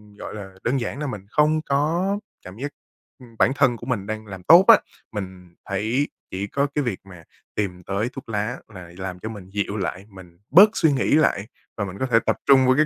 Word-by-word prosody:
gọi - - -8
là, 95 -2 -8
đơn 130 +3 +1
giản 125 - -4
là 150 - -2
mình 105 -6 -6
không 155 +3 +3
có 165 +8 0 0.3
cảm 95 +3 -10
giác, 145 +3 -4 0.5
ừm, 120 -3 -15
bản 130 - +5
thân 120 -4 +3
của 120 - -10
mình 110 -6 -1
đang 110 0 -4
làm 95 -2 -9
tốt 175 - +8
á, 230 - +9 0.3
mình 95 -3 -7
thấy 110 +9 0 0.2
chỉ 95 +2 -3
có 140 +6 0
cái 145 - +1
việc 120 -7 -2
mà 90 -4 -13 0.3
tìm 90 -4 -3
tới 100 +6 -1
thuốc 135 -4 -9
lá 105 +4 -2 0.2
là 90 -2 -10
làm 90 -1 -5
cho 110 - -5
mình 100 -4 -9
dịu 100 +1 -2
lại, 95 0 -3
mình 90 -3 -15
bớt 195 +8 +8
suy 160 - +3
nghĩ 135 - +1
lại 110 -9 +2 0.3
và 100 - -1
mình 95 0 -7
có 130 - 0
thể 115 -3 +4
tập - - +1
trung 130 -1 +6
vô 130 - +5
cái 155 - +5
110 Hz, 230 wpm, -23 LUFS, 95-140 Hz, 0.5 s, á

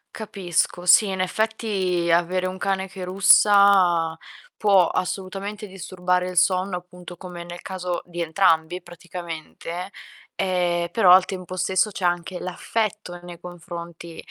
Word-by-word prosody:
Capisco. 180 -4 -2
Sì, 205 +4 +7
in 190 -1 -3
effetti 190 -4 -1
avere 180 +2 +1
un 185 +1 -5
cane 190 0 -1
che 185 -1 -9
russa 185 -3 +5 0.4
può 195 -4 +4
assolutamente 195 +3 -4
disturbare 180 -1 -2
il - - -10
sonno, 185 0 +2
appunto, 180 0 -11
come 175 -1 -9
nel 175 0 -9
caso 180 -2 -4
di 175 -1 -6
entrambi, 165 0 +1
praticamente. 175 +1 -8 0.4
Ehm, 175 -2 0
però, 185 -4 +5
al 185 0 +7
tempo 185 -1 -6
stesso, 190 +3 +1
c'è 190 -2 -4
anche 175 +1 -1
l'affetto 205 0 -3
nei 175 -1 -11
confronti, 170 -1 -9
180 Hz, 130 wpm, -23 LUFS, 175-190 Hz, 0.4 s, Sì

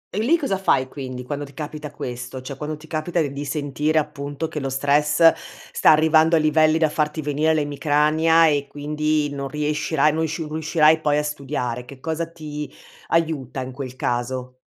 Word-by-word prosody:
E 210 - 0
lì 290 +10 +3
cosa 195 - -2
fai 130 -8 +2
quindi, 130 -3 -6
quando 145 +2 -4
ti 140 -1 -11
capita 150 0 -6
questo? 125 -2 -6
Cioè, 135 +1 -6
quando 150 +2 -5
ti 155 - -15
capita 160 +2 -2
d 150 - +1
di 145 +1 -5
sentire 150 +1 -1
appunto 150 +1 -2
che 150 - -5
lo 135 -1 -3
stress 145 +4 +4 0.4
sta - - +4
arrivando 160 +1 +5
a - - +4
livelli 155 +1 +3
da 160 -1 +3
farti 150 0 -1
venire 150 +2 +1
l'emicrania 155 +2 +3
e 145 -2 +1
quindi 150 +1 -1
non 140 -1 -4
riuscirai 150 +1 0
non 160 +1 0
sciu 160 0 -4
riuscirai 155 0 +3
poi 150 -1 +2
a 150 - +1
studiare. 135 -5 -3
Che 130 +1 -12
cosa 160 +2 -3
ti 150 -2 -7 0.4
aiuta 155 -6 -1
in 130 0 -6
quel 130 -1 -7
caso? 125 +1 -3
150 Hz, 185 wpm, -22 LUFS, 140-155 Hz, 0.4 s, arrivando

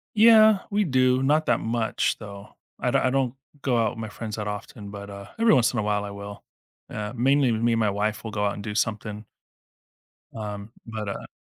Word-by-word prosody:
Yeah, 220 -1 +7
we 210 +1 +2
do 130 -5 +3
not 150 +3 +3
that 120 - +3
much 115 0 0
though. 100 -1 -10 0.2
I - - 0
don't - - +3
I 130 - +2
don't 130 -2 0 0.3
go 125 -3 +1
out 110 -2 +2
with - - -9
my 110 - -5
friends 110 0 -6
that 105 -1 -4
often, 105 0 -6
but 100 0 -8
uh, 100 0 -9
every 230 0 +5
once 125 -1 +4
in 120 - -1
a - - 0
while 105 -1 0
I 100 - -6
will. 100 0 -9 0.5
Uh, 105 -1 -4
mainly 135 +1 +3
me 115 +1 +1
and 115 - +1
my 110 -2 +2
wife 105 +2 -1
will 110 - -5
go 105 -1 -1
out 100 - +1
and 100 - -7
do 105 - -4
something. 105 -1 -2 1.1
Um, 105 -1 -6 0.2
but, 110 -2 -5
uh - - -6
110 Hz, 220 wpm, -25 LUFS, 105-125 Hz, 1.1 s, Yeah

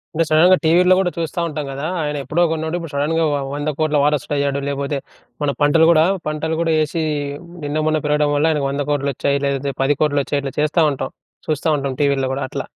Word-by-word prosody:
అంటే 165 - +3
సడెన్‌గా 170 +4 +6
టీవీలో 180 +3 +5
కూడా 185 -2 +1
చూస్తా 170 +1 -3
ఉంటాం 150 -2 -4
కదా! 140 +2 -5 0.2
ఆయన 150 -1 -2
ఎప్పుడో 165 +5 -1
కొన్నోడు 160 +1 -2
ఇప్పుడు 165 -3 -7
షడెన్‌గా 155 +3 0
వ 145 - +1 0.2
1,00,00,00,000 150 +1 -1
వారసుడు 150 -1 0
అయ్యాడు. 140 0 0
లేపోతే 140 +1 -2 0.5
మన 145 - +1
పంటలు 160 +3 +5
కూడా 160 -2 +5 0.2
పంటలు 160 +1 -2
కూడా 165 -1 +1
ఏసి 155 +2 -1 0.6
నిన్న 145 +1 -2
మొన్న 155 0 +2
పెరగడం 150 0 +2
వల్ల 145 +2 +2
ఆయనకు 145 -3 0
1,00,00,00,000 145 0 -1
వచ్చాయి 140 +2 0
లేదంతే 140 0 -2
10,00,00,000 145 +1 +1
వచ్చాయి. 145 +1 -1
ఇట్లా 135 - -4
చేస్తా 155 +2 +2
ఉంటాం 130 -1 -4 0.4
చూస్తా 155 0 -1
ఉంటాం. 140 -1 -3
టీవీలో 140 -2 +1
గూడా 140 - -3
అట్లా. - - -4
150 Hz, 190 wpm, -19 LUFS, 140-160 Hz, 0.6 s, సడెన్‌గా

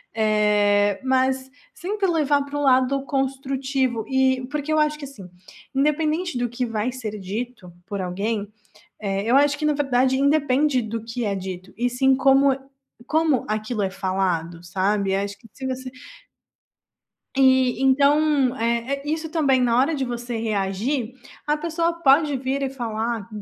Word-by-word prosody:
eh, 210 -2 +2
mas 260 0 +1 0.2
sempre 390 +5 -2
levar 295 -4 +2
para 285 +1 -5
o - - -1
lado 265 0 +3
construtivo 270 -2 -1
e 260 -1 +2
porque 300 +1 -2
eu - - +2
acho 300 0 +1
que 285 - -6
assim, 215 -10 -11 0.4
independente 305 +3 0
do 245 0 -1
que 245 +2 -2
vai 225 +1 -2
ser 225 -5 -6
dito 205 0 -6 0.2
por 200 -3 -4
alguém, 200 +3 -3 0.5
eh, 195 -1 -2
eu 235 +3 +2
acho 290 +1 +3
que 305 - -4
na 300 - +3
verdade 265 -2 +2
independe 280 -1 +2
do 225 0 -4
que 230 +1 -4
é 205 -2 0
dito 185 -1 -7
e 245 +2 0
sim 265 +2 +3
como 270 0 +4 0.5
como 315 -5 +2
aquilo 215 +1 -2
é 190 - 0
falado 185 -3 -2
sabe, 195 +2 0
acho 200 0 -3
que 225 - -18
se 265 - -6
você 260 0 -4 1.5
e 260 -2 +4
então, 280 -1 +3
é 235 0 +1 0.2
é - - -6
isso 320 +1 -2
também 280 -5 +2
na 240 -1 +2
hora 280 +5 +2
de 275 -2 -1
você 240 -1 -4
reagir 220 +4 -2 0.3
a 300 0 +2
pessoa 335 +2 -1
pode 285 +1 +4
vir 265 +2 -2
e 270 - 0
falar 230 -4 -3
255 Hz, 160 wpm, -23 LUFS, 215-280 Hz, 1.5 s, como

